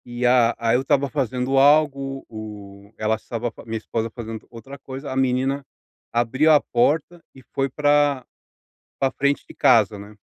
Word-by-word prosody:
E 120 Hz, 0 st, -4 dB
a 120 Hz, -1 st, +4 dB
aí 115 Hz, 0 st, +1 dB
eu 125 Hz, -, +2 dB
estava 140 Hz, +1 st, +1 dB
fazendo 130 Hz, -1 st, -1 dB
algo, 140 Hz, -2 st, +3 dB
o 105 Hz, -2 st, -10 dB
ela 110 Hz, +1 st, 0 dB
estava, 115 Hz, +2 st, -5 dB
minha 115 Hz, -1 st, -3 dB
esposa 115 Hz, +1 st, -3 dB
fazendo 115 Hz, -1 st, -8 dB
outra 135 Hz, +4 st, -11 dB
coisa, 135 Hz, +2 st, -8 dB
a -, -, -4 dB
menina 135 Hz, +1 st, 0 dB, 0.5 s
abriu 120 Hz, +7 st, +2 dB
a 150 Hz, -, +7 dB
porta 155 Hz, +8 st, 0 dB
e 130 Hz, -, -15 dB
foi 135 Hz, 0 st, 0 dB
pra 145 Hz, -1 st, +2 dB, 0.7 s
pra 135 Hz, -, +1 dB
frente 140 Hz, +1 st, 0 dB
de -, -, -13 dB
casa, 110 Hz, -5 st, +4 dB
né. 105 Hz, +1 st, -12 dB
125 Hz, 165 wpm, -22 LUFS, 115-140 Hz, 0.7 s, a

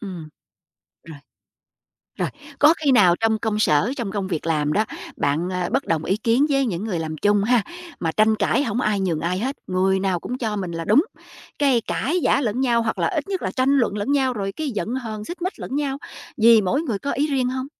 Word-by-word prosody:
Ừm. 180 Hz, -8 st, -7 dB, 0.8 s
Rồi. 160 Hz, -3 st, -10 dB, 1.0 s
Rồi, -, -, 0 dB, 0.3 s
có 305 Hz, +3 st, +6 dB
khi 290 Hz, -4 st, +2 dB
nào 180 Hz, -7 st, +5 dB
trong 225 Hz, -1 st, +2 dB
công 215 Hz, -1 st, -1 dB
sở, 185 Hz, -, +3 dB
trong 230 Hz, -6 st, -3 dB
công 200 Hz, -2 st, -2 dB
việc 165 Hz, -2 st, -3 dB
làm 150 Hz, -2 st, +1 dB
đó, 215 Hz, +5 st, +2 dB, 0.3 s
bạn, 150 Hz, +5 st, 0 dB
a, 180 Hz, -1 st, -1 dB
bất 270 Hz, +2 st, 0 dB
đồng 160 Hz, -1 st, 0 dB
ý 195 Hz, -, +1 dB
kiến 240 Hz, +5 st, +2 dB
với 275 Hz, -2 st, +2 dB
những 190 Hz, -1 st, -3 dB
người 185 Hz, -7 st, -2 dB
làm 155 Hz, -1 st, -4 dB
chung 205 Hz, -1 st, +2 dB
ha, 235 Hz, -2 st, +3 dB, 0.4 s
mà 160 Hz, -1 st, -1 dB
tranh 215 Hz, 0 st, +3 dB
cãi 280 Hz, -, +1 dB
hổng 230 Hz, 0 st, -1 dB
ai 210 Hz, -4 st, 0 dB
nhường 175 Hz, -5 st, -1 dB
ai 180 Hz, +2 st, -1 dB
hết, 265 Hz, +7 st, -2 dB
người 190 Hz, +1 st, +1 dB
nào 190 Hz, -3 st, 0 dB
cũng 250 Hz, +7 st, -5 dB
cho 220 Hz, -4 st, -2 dB
mình 185 Hz, -3 st, -4 dB
là 165 Hz, 0 st, -4 dB
đúng, 250 Hz, -, +4 dB, 0.5 s
cái 270 Hz, -5 st, +3 dB
cãi 320 Hz, +10 st, -1 dB
vã 275 Hz, -, +3 dB
lẫn 230 Hz, +2 st, -1 dB
nhau 235 Hz, -3 st, +2 dB
hoặc 220 Hz, -, -2 dB
là -, -, +1 dB
ít -, -, -3 dB
nhất 380 Hz, -2 st, -3 dB
là -, -, -1 dB
tranh 260 Hz, 0 st, +1 dB
luận 245 Hz, -7 st, +2 dB
lẫn 210 Hz, +8 st, -1 dB
nhau 265 Hz, -2 st, +2 dB
rồi 195 Hz, -4 st, -3 dB
cái 310 Hz, -3 st, -4 dB
giận 220 Hz, +1 st, -3 dB
hờn, 220 Hz, -5 st, -5 dB
xích 345 Hz, +4 st, -8 dB
mích 370 Hz, -, -3 dB
lẫn 270 Hz, -, -4 dB
nhau, 280 Hz, -2 st, -1 dB, 0.4 s
vì 225 Hz, -1 st, +6 dB
mỗi 265 Hz, +11 st, 0 dB
người 235 Hz, -11 st, -2 dB
có 280 Hz, -, -3 dB
ý 280 Hz, +5 st, +1 dB
riêng 260 Hz, -3 st, 0 dB
hông? 260 Hz, +1 st, -3 dB
220 Hz, 235 wpm, -22 LUFS, 185-265 Hz, 1.0 s, có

